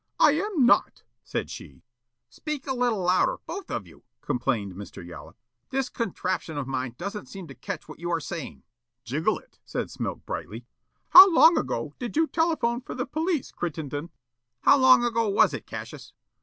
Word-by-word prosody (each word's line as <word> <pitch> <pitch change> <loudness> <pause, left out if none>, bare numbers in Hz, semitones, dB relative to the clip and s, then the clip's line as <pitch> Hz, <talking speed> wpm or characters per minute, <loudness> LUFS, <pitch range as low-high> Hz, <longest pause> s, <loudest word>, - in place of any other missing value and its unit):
"I 300 - +7
am 330 - +1
not," 240 - +3 0.2
said - - -4
she. 70 - -11 0.4
"Speak 300 -3 -6
a 270 - -1
little 240 -6 0
louder, 180 +1 +2
both 390 +3 -7
of 105 - -3
you," 85 - -18 0.2
complained 115 - -2
Mr. 95 -2 -9
Yollop. 85 0 -11 0.3
"This 265 -1 -1
contraption 185 -7 -3
of 145 - -2
mine 130 -2 -3
doesn't 200 +3 -6
seem 190 -3 -9
to - - -8
catch - - -7
what - - -11
you 175 +1 -4
are 170 -1 +1
saying." 160 -1 -7 0.4
"Jiggle 155 - 0
it," - - -19
said - - -4
Smilk - - -5
brightly. - - -6 0.4
"How 380 +1 +11
long 330 +1 +7
ago - - -2
did 245 +1 -5
you 320 - +4
telephone 310 -8 0
for - - -8
the 250 0 -2
police, 315 +2 -2
Crittenden?" 155 -2 -4 0.5
"How 280 - +6
long 260 -2 +7
ago 230 -2 +1
was 200 - +4
it, - - -6
Cassius?" - - -8
215 Hz, 175 wpm, -26 LUFS, -, 0.5 s, How